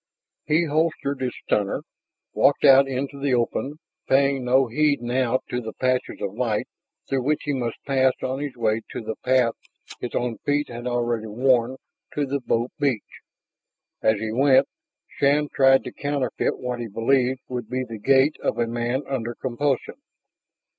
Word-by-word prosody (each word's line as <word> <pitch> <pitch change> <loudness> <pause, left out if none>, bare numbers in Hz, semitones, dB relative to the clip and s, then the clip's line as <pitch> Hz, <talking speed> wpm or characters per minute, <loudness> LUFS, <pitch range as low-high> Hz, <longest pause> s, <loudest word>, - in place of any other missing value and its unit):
He 155 +3 +3
holstered 150 -3 -1
his 125 -1 -2
stunner, 100 -1 0 0.5
walked 145 - +3
out 135 0 +7
into 135 +1 -4
the 135 -2 +2
open, 125 +4 -1 0.3
paying 135 0 +3
no 130 +2 +4
heed 145 +4 +1
now 125 +1 0
to 125 - -1
the 110 -1 -7
patches 130 0 -1
of 95 - -3
light 110 -2 -1 0.4
through 135 -1 0
which 150 +4 0
he 145 - -1
must 120 -4 -4
pass 130 -1 +3
on 130 +1 -2
his 145 -2 -4
way 110 -1 +1
to - - -4
the 110 0 -4
path 125 -3 +3 0.5
his 125 - -5
own 120 -2 -2
feet 145 +1 0
had 120 +1 -6
already 120 -2 -1
worn 125 +2 +2 0.4
to 145 - +1
the 140 +1 -2
boat 120 0 0
beach. 130 -7 -2 0.8
As 110 -1 +2
he 110 0 -3
went, 130 +3 +4 0.4
Shann 145 +1 +1
tried 135 -1 +5
to - - -6
counterfeit 145 -3 -1
what 125 -1 -4
he 120 - -4
believed 125 +4 +1
would 125 -1 -5
be 130 +1 -1
the 115 -3 -8
gait 135 +6 +3
of - - -1
a 120 - +2
man 120 +3 -2
under 120 -3 -3
compulsion. 135 - -2
130 Hz, 165 wpm, -24 LUFS, 120-140 Hz, 0.8 s, out